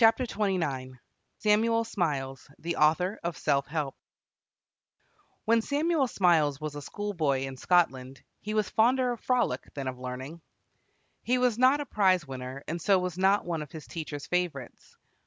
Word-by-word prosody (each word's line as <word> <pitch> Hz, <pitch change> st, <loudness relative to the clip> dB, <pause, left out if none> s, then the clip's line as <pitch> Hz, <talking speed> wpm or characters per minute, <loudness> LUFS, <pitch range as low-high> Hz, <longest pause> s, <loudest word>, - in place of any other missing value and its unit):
ELIZABETH 225 Hz, +2 st, +4 dB
ROSSER 145 Hz, -, -1 dB, 0.4 s
SAMUEL 225 Hz, +2 st, +3 dB
SMILES, 140 Hz, -, -3 dB
THE 170 Hz, 0 st, -3 dB
AUTHOR 170 Hz, +7 st, +2 dB
OF 170 Hz, -2 st, -3 dB
"SELF 140 Hz, -2 st, +1 dB
HELP" 150 Hz, -3 st, -2 dB, 1.5 s
When 230 Hz, +1 st, +4 dB
Samuel 290 Hz, +2 st, +1 dB
Smiles 160 Hz, -, +2 dB
was 155 Hz, -1 st, -4 dB
a 145 Hz, -, -6 dB
schoolboy 160 Hz, -8 st, -1 dB
in 135 Hz, 0 st, -4 dB
Scotland, 135 Hz, -5 st, +1 dB, 0.2 s
he 215 Hz, +1 st, -4 dB
was 215 Hz, -2 st, +1 dB
fonder 250 Hz, +3 st, +3 dB
of 240 Hz, -, -5 dB
frolic 250 Hz, -1 st, 0 dB
than 135 Hz, -2 st, -4 dB
of 130 Hz, -1 st, -5 dB
learning. 130 Hz, +6 st, -6 dB, 0.8 s
He 250 Hz, +1 st, +1 dB
was 250 Hz, -2 st, +1 dB
not 260 Hz, +3 st, +5 dB
a -, -, -4 dB
prize 185 Hz, -, +2 dB
winner, 130 Hz, 0 st, -7 dB
and 170 Hz, +1 st, -3 dB
so 195 Hz, +3 st, +4 dB
was 180 Hz, -1 st, -3 dB
not 195 Hz, +2 st, +3 dB
one 170 Hz, -2 st, -2 dB
of 150 Hz, -, -8 dB
his 160 Hz, -2 st, -9 dB
teacher's 150 Hz, -3 st, -6 dB
favorites. 175 Hz, -8 st, -3 dB
170 Hz, 155 wpm, -28 LUFS, 140-215 Hz, 1.5 s, not